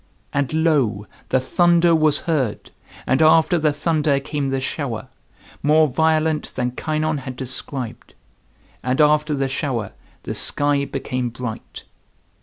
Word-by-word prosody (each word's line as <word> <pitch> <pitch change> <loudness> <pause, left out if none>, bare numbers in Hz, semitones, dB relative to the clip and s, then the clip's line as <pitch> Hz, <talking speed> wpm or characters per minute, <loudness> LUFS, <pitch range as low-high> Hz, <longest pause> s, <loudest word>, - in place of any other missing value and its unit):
And, 140 -2 0
lo! 150 -11 +1 0.2
the 130 - +3
thunder 170 +5 +3
was 155 -2 +3
heard, 140 -10 -2 0.3
and 130 +3 +2
after 165 +2 +5
the 155 -1 +2
thunder 150 -1 +1
came 140 0 -3
the 135 0 -1
shower, 130 -3 -4 0.5
more 155 +2 +4
violent 160 +2 0
than 125 0 -1
Kynon 155 +2 -2
had 130 -1 -7
described, 130 -1 -6 0.7
and 130 +2 -1
after 150 0 +3
the 135 -1 0
shower 130 -5 -3 0.3
the - - -4
sky 145 -1 +1
became 130 -3 -3
bright. 120 -1 -7
145 Hz, 130 wpm, -21 LUFS, 130-155 Hz, 0.7 s, after